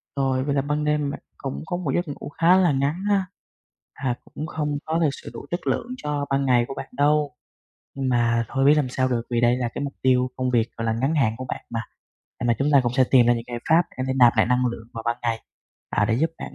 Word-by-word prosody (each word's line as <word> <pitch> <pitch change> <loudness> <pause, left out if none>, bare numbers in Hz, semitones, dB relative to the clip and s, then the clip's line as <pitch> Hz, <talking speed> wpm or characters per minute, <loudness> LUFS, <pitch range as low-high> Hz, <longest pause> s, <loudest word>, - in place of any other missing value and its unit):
Rồi, 135 -1 +1
vậy 140 0 -1
là 135 - +2
ban 150 +1 -1
đêm 150 -1 +1
bạn - - -6 0.2
cũng 70 +2 -5
có 175 - -2
một 160 -7 -2
giấc 175 -1 0
ngủ 145 0 -7
khá 165 +4 +4
là 180 -5 +4
ngắn 140 +7 0
ha, 195 -2 +2 0.7
hà 130 -3 -2
cũng 155 - -6
không 150 -2 -2
có 160 +1 0
thực 160 -3 +3
sự - - -9
đủ - - -8
chất 175 - -3
lượng 235 - 0
cho 145 -1 -2
ban 135 0 +1
ngày 120 -2 +3
của 135 - -5
bạn - - -7
đâu, 145 -2 +2 0.6
nhưng 135 -1 -1
mà 115 -1 +2
thôi 135 0 +1
biết 145 - +7
làm 140 -4 +1
sao 130 +1 0
được, 120 -2 0
vì 120 0 +1
đây 120 +1 +4
là 120 -2 -1
cái 145 - -2
mục 140 - -4
tiêu 130 -1 +3
công 130 0 0
việc, 120 -1 +2
gọi 115 - -3
là, 110 - +1
ngắn 135 +7 0
hạn 115 -7 +2
của 130 - -6
bạn - - -6
mà. 115 -1 -2 0.6
À, - - -4
mà 120 - +3
chúng 140 +2 +1
ta 140 - +7
cũng 120 -1 -1
sẽ 130 - +5
tìm 125 -3 +7
ra 120 - +5
những 115 - -3
giải 120 -1 -4
pháp 165 +2 +6 0.2
có - - 0
thể - - +1
nạp 120 -2 +7
lại 110 - +4
năng 125 +1 +2
lượng 115 -1 -5
vào 115 - -5
ban 120 0 +1
ngày, 115 -2 -1 0.5
à, - - +2
để 110 - +1
giúp 160 +6 +1
bạn - - -7
135 Hz, 275 wpm, -24 LUFS, 120-150 Hz, 0.7 s, biết